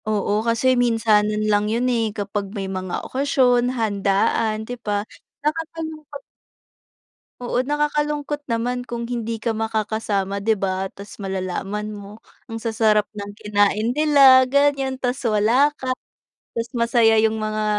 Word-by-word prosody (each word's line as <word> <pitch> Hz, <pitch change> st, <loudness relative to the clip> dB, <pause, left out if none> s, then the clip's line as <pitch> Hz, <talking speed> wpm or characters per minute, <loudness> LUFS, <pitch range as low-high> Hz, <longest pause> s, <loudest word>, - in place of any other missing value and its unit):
Oo, 210 Hz, 0 st, 0 dB
kasi 230 Hz, +3 st, +2 dB
minsanan 215 Hz, -3 st, +2 dB
lang 210 Hz, 0 st, +2 dB
yun 235 Hz, +3 st, 0 dB
eh, 225 Hz, -2 st, +1 dB
kapag 200 Hz, -1 st, -3 dB
may 195 Hz, -, -3 dB
mga 185 Hz, -1 st, -4 dB
okasyon, 255 Hz, -3 st, +2 dB
handaan, 215 Hz, +1 st, 0 dB
'di 245 Hz, +1 st, -7 dB
ba? 205 Hz, -1 st, -2 dB, 0.4 s
Nakakalungkot 315 Hz, -2 st, -4 dB, 1.2 s
oo 245 Hz, 0 st, -3 dB
nakakalungkot 295 Hz, 0 st, -1 dB
naman 245 Hz, +2 st, -1 dB
kung 235 Hz, -1 st, -5 dB
hindi 230 Hz, -2 st, -3 dB
ka 225 Hz, 0 st, -2 dB
makakasama, 215 Hz, -3 st, -2 dB
'di 220 Hz, 0 st, +2 dB
ba? 190 Hz, 0 st, -1 dB
Tas 200 Hz, +1 st, -11 dB
malalaman 195 Hz, +2 st, -3 dB
mo, 205 Hz, +1 st, -11 dB, 0.3 s
ang 225 Hz, -, -4 dB
sasarap 220 Hz, -2 st, +2 dB
ng 205 Hz, 0 st, -6 dB
kinain 210 Hz, +3 st, +1 dB
nila 280 Hz, -4 st, +7 dB
ganyan, 275 Hz, -1 st, +1 dB
tas 250 Hz, +1 st, -2 dB
wala 230 Hz, +6 st, +3 dB
ka, 260 Hz, -, -4 dB, 0.7 s
tas 230 Hz, 0 st, -2 dB
masaya 235 Hz, -1 st, +4 dB
yung 220 Hz, 0 st, +1 dB
mga 215 Hz, 0 st, -2 dB
225 Hz, 130 wpm, -22 LUFS, 210-250 Hz, 1.2 s, nila